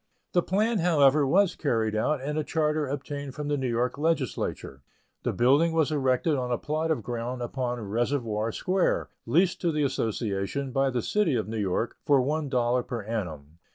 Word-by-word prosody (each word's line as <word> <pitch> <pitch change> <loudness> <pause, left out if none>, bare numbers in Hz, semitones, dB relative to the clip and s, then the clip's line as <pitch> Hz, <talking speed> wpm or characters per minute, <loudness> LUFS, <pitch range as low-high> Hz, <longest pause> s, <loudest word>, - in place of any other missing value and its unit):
The 175 - +4
plan, 210 +5 +1
however, 150 -4 +4
was 195 +6 +3
carried 110 -7 0
out, 130 +6 0
and 150 +2 -2
a - - 0
charter 150 -1 0
obtained 140 0 -5
from 150 -1 -4
the 145 - +2
New 130 -3 -1
York 120 +4 -1
Legislature. 135 - -2 0.4
The - - -1
building 140 +7 +3
was 160 -2 +2
erected 140 +1 +1
on 125 -1 -2
a 120 - +1
plot 155 +5 -2
of 150 -9 0
ground 120 +2 -4
upon 125 0 -3
Reservoir 115 -1 -1
Square, 185 - 0 0.2
leased 175 +3 +2
to 170 - +1
the 150 -1 0
association, 115 +1 -2
by 135 +1 +2
the 125 -2 -2
City 205 -10 +1
of 110 - -1
New 110 0 -3
York, 100 +3 -1
for 140 -2 +4
one 145 +3 -1
dollar 125 -1 +2
per 120 -2 -5
annum. 85 -8 -5
135 Hz, 185 wpm, -27 LUFS, 120-155 Hz, 0.4 s, The